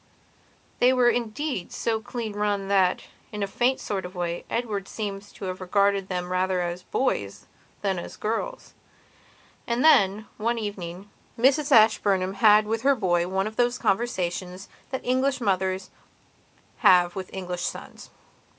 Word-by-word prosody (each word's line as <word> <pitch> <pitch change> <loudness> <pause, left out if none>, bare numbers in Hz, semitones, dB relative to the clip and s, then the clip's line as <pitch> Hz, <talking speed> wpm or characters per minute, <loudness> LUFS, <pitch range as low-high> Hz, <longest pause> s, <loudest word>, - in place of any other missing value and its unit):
They 250 +1 +5
were 245 -2 +4
indeed 240 - -3
so 225 -1 -1
clean 225 -1 -5
run 205 -1 -1
that, 190 -2 +2 0.3
in 210 -2 -3
a - - -1
faint 245 +6 +1
sort 195 -2 -3
of 180 +1 -9
way, 175 -1 -3
Edward 210 -5 -2
seems 205 -1 -6
to - - -8
have 185 0 -5
regarded 200 +1 +1
them 180 -1 -3
rather 185 0 +1
as 175 +1 -3
boys 140 - -2 0.4
than 190 -3 0
as - - -9
girls. 230 - -4 0.9
And 240 +4 0
then, 210 -8 +5
one 235 +2 0
evening, 200 -3 -6 0.3
Mrs 280 +5 +3
Ashburnham 200 -5 +4
had 210 0 +5
with 225 +1 -2
her 275 +2 +4
boy 175 -6 +1
one 190 +1 -1
of 220 0 -6
those 245 0 +2
conversations 185 -3 -2 0.2
that 265 - -5
English 260 +2 +1
mothers 190 -3 -1 0.9
have 175 -1 +5
with 190 -1 -6
English 180 -2 -5
sons. - - -6
200 Hz, 150 wpm, -25 LUFS, 185-230 Hz, 0.9 s, They